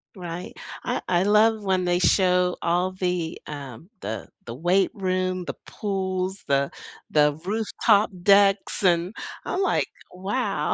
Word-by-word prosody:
Right. 175 -1 -6 0.3
I - - -1
I 180 0 +2
love 215 +1 +4
when 185 -2 +1
they 175 0 +2
show 180 -1 +3
all 180 +2 +1
the, 180 -3 -2
um, 145 - -8
the 110 +1 -5 0.2
the 115 - -6
weight 180 +7 +2
room, 185 -2 -1
the - - -4
pools, 190 -1 -3
the 140 0 +1 0.4
the 150 0 +3
rooftop 215 0 +2
decks, 200 0 +4
and 175 +2 +2 0.3
I'm 370 - -1
like, 380 - +2 0.3
"Wow, 195 +8 -1
185 Hz, 135 wpm, -25 LUFS, 175-195 Hz, 0.4 s, love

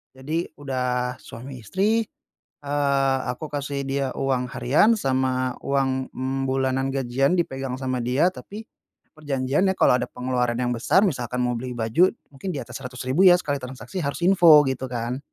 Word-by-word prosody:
Jadi 155 +6 -3
udah 125 -3 -2
suami 125 +2 -10
istri, 210 - 0 0.6
eee, 140 -2 +1
aku 155 +5 -7
kasih 140 -1 -3
dia 135 0 -1
uang 130 -2 0
harian 145 - +3
sama 130 -2 0
uang, 135 -1 0
mmm, 130 +1 -2
bulanan 130 0 0
gajian 135 +3 +1
dipegang 135 -5 -2
sama 130 -1 -2
dia, 130 +8 +2
tapi 210 +3 -9 0.5
perjanjiannya 145 +6 0
kalau 125 - +4
ada - - -2
pengeluaran 125 -1 -2
yang 125 - 0
besar, 125 - +2
misalkan 125 - -1
mau 125 -1 0
beli 125 +1 -5
baju 120 +11 +2 0.2
mungkin 160 +7 -6
diatas 135 -6 -6
Rp100.000 130 +6 0
ya 180 - +9
sekali 145 -5 0
transaksi 130 +8 -8
harus 145 -1 -3
info 175 -4 +7
gitu 130 -2 -2
kan, 120 0 -3
135 Hz, 155 wpm, -24 LUFS, 125-145 Hz, 0.6 s, ya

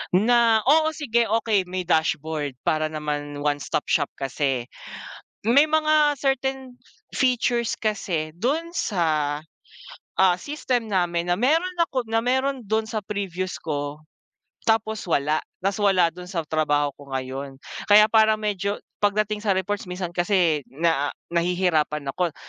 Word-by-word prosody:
na 225 +1 +4
oo, 310 +4 +3
sige 235 -6 +1
okey 215 -4 +1
may 185 0 -3
dashboard 160 -4 0
para 155 0 +1
naman 145 -1 -4
one 145 -1 +1
stop 145 - -2
shop - - +2
kasi, 135 -2 -1 0.9
may 280 +5 +6
mga 310 -1 +3
certain 265 -2 -1 0.4
features 245 -2 +1
kasi 170 -7 -2
dun 285 - -1
sa, 155 -6 0 0.8
ah, 190 -1 +5
system 255 -6 -2
namin 175 -3 0
na 175 - +2
meron 330 - +1
ako 260 -9 0
na 225 +1 0
meron 260 0 0
dun 220 +2 -1
sa 215 -2 -3
previews 185 -3 -3
ko, 145 -1 -4 0.7
tapos 220 -2 0
wala, 150 -1 +1 0.2
tapos 195 +1 0
wala 190 -4 +3
dun 180 +2 -11
sa 175 -2 -3
trabaho 145 -2 +1
ko 140 - -13
ngayon. 135 +1 -4 0.3
Kaya 210 +1 +7
parang 220 -1 +4
medyo 205 -1 -1 0.2
pagdating 210 +1 +1
sa 210 -2 +1
reports 195 +2 -2
minsan 180 -1 -4
kasi 175 -4 +1
na, 145 0 0 0.2
nahihirapan 170 -4 0
ako 170 +2 -2
190 Hz, 135 wpm, -24 LUFS, 155-230 Hz, 0.9 s, Kaya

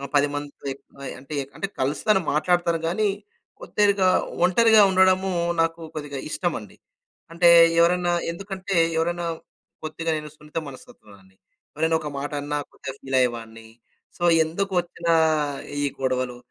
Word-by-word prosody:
10తో 145 0 -1 0.5
అంటే 140 +3 -10
ఎక్కు 135 +1 -10
అంటే 195 - -2
కలుస్తాను. 160 +9 +1
మాట్లాడతాను 170 +1 +1
గానీ, 205 +5 +1 0.5
కొద్దిగా 200 - +2 0.4
ఒంటరిగా 220 +3 +5
ఉండడము 190 0 +3 0.3
నాకు 165 0 0 0.2
కొద్దిగా 145 -2 -5
ఇష్టమండి. 155 - -4 0.6
అంటే 170 0 +5 0.3
ఎవరన్నా 175 0 +2 0.2
ఎందుకంటే, 195 +1 -5 0.2
ఎవరైనా 170 +1 -1 0.6
కొద్దిగా 165 +1 -3
నేను 150 0 -7
సున్నిత 150 +1 -10
మనస్తత్వంని. 100 -7 -16 0.4
ఎవరైనా 160 +2 +1
ఒక 150 - -5
మాట 145 +2 -4
అన్నా 145 +1 -3
కొద్దిగా 135 -1 -8
ఫీల్ 135 -1 -1
అయ్యేవాడిని. 115 -2 -2 0.5
సో, 175 - -6 0.2
ఎందుకు 190 +5 -3
వచ్చిన 170 0 -9 0.8
ఈ - - +2 0.2
గొడవలు. 130 -1 -1
165 Hz, 120 wpm, -24 LUFS, 140-185 Hz, 0.8 s, ఒంటరిగా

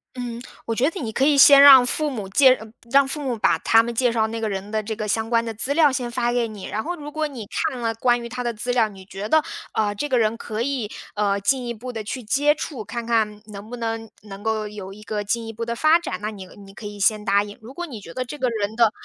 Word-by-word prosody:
嗯， 240 -2 -5 0.2
我 230 - -1
觉 250 +6 +2
得 370 - -7
你 230 -6 -4
可 265 - 0
以 285 0 +4
先 280 0 +9
让 270 -3 +10
父 300 +4 -1
母 220 -8 -5
介 260 +5 +6
呃， 220 - -11 0.2
让 275 +1 +5
父 295 +2 -4
母 250 -4 -2
把 - - +2
他 225 0 +4
们 235 +1 -4
介 245 +1 +2
绍 225 -2 +1
那 225 +1 -5
个 220 - -1
人 195 +1 -5
的 220 0 0
这 220 +1 -5
个 215 0 -4
相 225 +2 -1
关 230 -1 +2
的 225 - -4
资 255 +6 -1
料 305 -3 +5
先 255 -2 -2
发 240 0 0
给 240 -1 +1
你， 210 -3 -9
然 215 +1 -3
后 350 +2 -3
如 295 -2 -9
果 310 0 -1
你 255 -7 -8 0.2
看 255 - -7
了 230 -1 -1
关 240 +2 +2
于 235 - -6
他 250 +1 -5
的 240 - -1
资 235 +3 -3
料， 230 -3 +3
你 190 -2 -13
觉 200 +2 -6
得， 315 +3 +4 0.3
呃， 210 -1 0
这 290 +9 -4
个 255 - +2
人 220 -1 +2
可 225 -1 -4
以， 255 -5 -2 0.2
呃， 200 -1 0
进 250 +5 0
一 235 - -3
步 250 +3 -8
地 220 -2 -5
去 245 +4 -5
接 290 +7 +2
触， 285 -5 -6
看 230 +3 -5
看 220 -3 0
能 205 +1 -9
不 245 - -6
能， 225 -1 -4
能 200 -1 -10
够 220 -1 -1
有 205 -2 -8
一 210 +1 -13
个 210 0 -3
进 230 +3 -2
一 225 - -7
步 230 +2 -5
的 235 0 -3
发 310 +6 +4
展， 340 - -4
那 210 +1 -3
你 195 -3 -10 0.2
你 195 - -14
可 210 +1 -8
以 205 0 -9
先 210 +2 +2
答 200 0 +3
应。 205 0 -9
如 225 +3 -11
果 350 - -4
你 245 -10 -9
觉 165 - -11
得 255 +7 -4
这 295 +4 -8
个 255 -1 +1
人 215 -2 -3
的 230 -2 +4
230 Hz, 310 characters per minute, -23 LUFS, 210-255 Hz, 0.3 s, 让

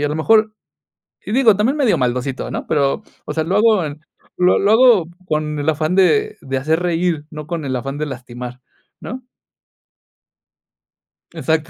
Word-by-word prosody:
y - - -3
a 145 - +1
lo 150 - -3
mejor, 215 +6 +3 0.7
y - - -5
digo, 230 -4 +5
también 240 +9 +1
medio 260 -7 +2
maldosito, 125 +1 -2
¿no?, - - -5
pero, 140 -1 0 0.2
o 150 - -4
sea, 160 0 0
lo 190 +4 -1
hago 215 -6 +3
en 150 +1 -7 0.4
lo 180 0 +4
lo 200 +2 +2
hago 225 -7 +5 0.2
con 150 -1 -2
el 145 +2 0
afán 155 +3 0
de 425 - +3
de 135 0 -3
hacer 155 +5 0
reír, 170 -3 -1
no 150 -1 -8
con 170 -2 -4
el 130 - -2
afán 135 +3 -4
de 155 - -2
lastimar, 125 -1 -8 0.4
¿no? 255 0 -7 2.1
Exacto. 160 +1 -1
160 Hz, 175 wpm, -19 LUFS, 145-205 Hz, 2.1 s, digo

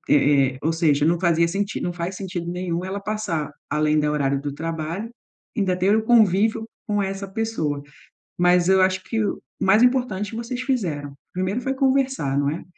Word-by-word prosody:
É, 140 -2 +4
é, - - -11
ou 160 - +1
seja, 155 -3 +2
não 165 +2 +2
fazia 170 -2 +3
sentido, 200 +4 -2
não 175 - -1
faz 175 +2 -4
sentido 180 -3 -4
nenhum 180 -1 -3
ela 190 +2 -3
passar 200 -8 -3 0.2
além 150 +1 +2
do 150 - +1
horário 140 -2 0
do 145 0 -4
trabalho, 165 +6 -4 0.5
ainda 190 -4 +1
ter 190 +3 +3
o 220 - +1
convívio 220 0 +3 0.2
com 205 -1 0
essa 195 0 -4
pessoa. 190 -9 -2 0.6
Mas 180 0 +4
eu 190 0 +5
acho 185 0 +2
que 225 -1 -1
o - - -2 0.2
mais 210 +4 +4
importante 245 -5 +1
vocês 235 +2 -4
fizeram. 170 - -2 0.2
Primeiro 185 +6 -1
foi 270 +2 -2
conversar, 265 - +1
não 140 0 +1
é, 160 - -5
185 Hz, 185 wpm, -23 LUFS, 155-215 Hz, 0.6 s, eu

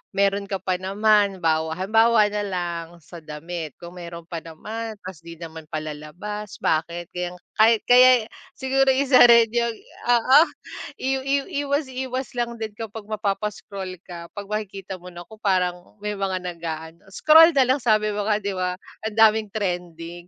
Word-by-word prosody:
meron 200 0 +1
ka 195 - -1
pa 185 -1 0
naman 200 0 +2
bawa 160 0 +1
halimbawa 220 +3 +4
na 210 - -2
lang 175 -3 -3 0.2
sa 170 +3 -11
damit 155 0 -7
kung 175 0 -10
meron 170 -1 -8
pa 170 -1 -5
naman 220 +7 -7
tapos 185 -3 -8
di 170 0 -9
naman 160 -2 -9
palalabas 155 +7 -6
bakit 170 +2 -1
kaya 180 0 -4 0.5
kaya 250 -2 +6 0.3
siguro 270 0 +1
isa 270 -1 +6
rin 235 -1 +6
'yong 235 -1 0 0.4
oo, 255 +5 +6 0.6
iw 265 +1 +1
iw 275 0 +1 0.2
iwas 285 0 0
iwas 260 0 -4
lang 235 0 -1
din 220 -1 -4
kapag 225 -2 -7
mapapa-scroll 200 -2 -4
ka 170 -2 -9
'pag 205 -1 -7
makikita 195 -3 -5
mo 180 - -11
na 175 0 -9
ko 220 - -13
parang 180 -2 -1
may 210 0 -2
mga 190 -1 -1
nag-aano 165 -1 -7
scroll 320 - +7
na 265 - +5
lang 260 +2 +2
sabi 215 -2 +2
mo 205 - -1
nga 210 -1 +2
'di 200 0 -3
ba, 180 0 -2 0.3
ang 220 - -3
daming 220 -1 +5
trending, 175 -4 -4
200 Hz, 165 wpm, -23 LUFS, 175-225 Hz, 0.6 s, scroll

